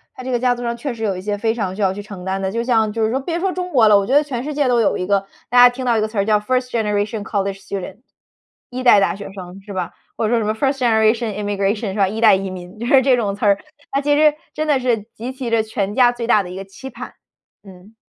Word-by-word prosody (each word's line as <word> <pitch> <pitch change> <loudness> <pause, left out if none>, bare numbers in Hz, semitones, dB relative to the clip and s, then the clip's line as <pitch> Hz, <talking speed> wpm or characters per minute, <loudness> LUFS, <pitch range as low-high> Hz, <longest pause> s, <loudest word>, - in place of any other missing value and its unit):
它 255 - -9
这 255 - -4
个 245 - +1
家 250 0 +2
族 245 - -7
上 235 0 -2
确 245 +2 -4
实 225 - -7
有 200 -3 0
一 - - -6
些 205 +1 -2
非 225 +1 0
常 195 -5 -3
需 210 - -5
要 190 -1 +2
去 205 - -6
承 200 -3 -10
担 190 +1 -2
的， 190 0 -2
就 230 +3 -2
像 225 -3 +2
就 225 +1 -2
是 220 - -1
说 260 - 0
别 335 +5 -3
说 380 +1 0
中 360 0 -4
国 235 -7 +5
了， 210 - +6
我 200 - 0
觉 260 - 0
得 290 +1 +5
全 255 -4 -4
世 300 - -4
界 285 -2 +1
都 245 -1 +3
有 210 - +1
一 180 - -3
个。 195 0 +1 0.2
大 245 - +1
家 245 0 +9
听 255 +1 -5
到 235 -2 +2
一 - - +1
个 215 - 0
词 215 0 -9
儿 200 - +2
叫 210 -1 +3
first 250 +3 -1
generation 210 -1 -1
college 195 -1 -3
student， 200 0 -6 0.7
一 255 +1 -5
代 225 -5 +7
大 195 - +1
学 200 0 -9
生， 185 0 -10
是 200 +1 -10
吧？ 180 -2 -3 0.3
或 225 - 0
者 - - -1
说 235 - +3
什 220 - -2
么 215 - 0
first 270 +4 0
generation 220 -2 +2
immigration 205 +1 -1
是 - - -8
吧？ 195 -2 +3
一 215 +4 -4
代 215 -3 +7
移 190 0 -3
民， 185 +2 -10
就 235 - -4
是 270 0 +6
这 260 -1 +4
种 205 -5 -1
词 205 - -3
儿。 200 -1 +4 0.3
他 275 - 0
其 290 0 +2
实 305 0 +5 0.2
真 310 - -3
的 290 -3 +3
是 240 -4 0
集 240 +4 -5
齐 260 -2 -5
着 230 -1 +2
全 205 -2 -3
家 245 -2 +5
最 240 -1 -5
大 215 -3 +4
的 180 - -8
一 180 - -8
个 195 +1 -7
期 195 +7 -10
盼， - - -9 0.5
嗯。 195 +2 -16
220 Hz, 485 characters per minute, -19 LUFS, 200-250 Hz, 0.7 s, 家